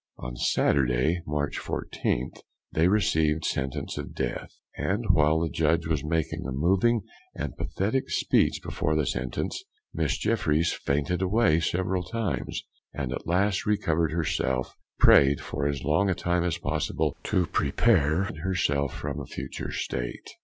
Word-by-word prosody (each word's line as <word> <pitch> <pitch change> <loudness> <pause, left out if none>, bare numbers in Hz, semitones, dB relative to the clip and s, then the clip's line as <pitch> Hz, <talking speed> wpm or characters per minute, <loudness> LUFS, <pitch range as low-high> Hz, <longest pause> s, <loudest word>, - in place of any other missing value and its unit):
On - - -6
Saturday, 65 +7 +2
March 75 -1 -1
14th, 60 - -2 0.3
they 80 +2 +3
received 80 -6 +2
sentence 70 +1 -2
of - - -7
death; - - -3 0.3
and 100 - -1
while 80 -1 +3
the 85 - 0
judge 80 +1 +1
was 80 -3 -1
making 80 0 -1
a - - -4
moving 95 - +2 0.3
and - - -4
pathetic 120 +8 -1
speech - - +2
before 75 - -1
the 75 -2 +1
sentence, 65 0 -3 0.3
Miss 75 -3 0
Jeffryes 85 -7 +1
fainted 75 +6 -1
away 95 -3 +3
several 90 +2 0
times, 110 +3 -3 0.3
and 65 -2 -3
at - - -6
last 95 +4 +1
recovered 85 -6 +1
herself, 80 -6 -1 0.2
pray'd 70 0 +6
for 70 - -2
as 70 -3 -2
long 80 +6 +2
a 90 - +1
time 90 0 0
as 85 -2 0
possible - - -1
to 90 - +2
prepare 80 +1 +2 0.2
herself 70 -7 0
for 75 - -4
a 70 0 -5
future - - -6
state. - - -4
80 Hz, 145 wpm, -27 LUFS, 70-90 Hz, 0.3 s, pray'd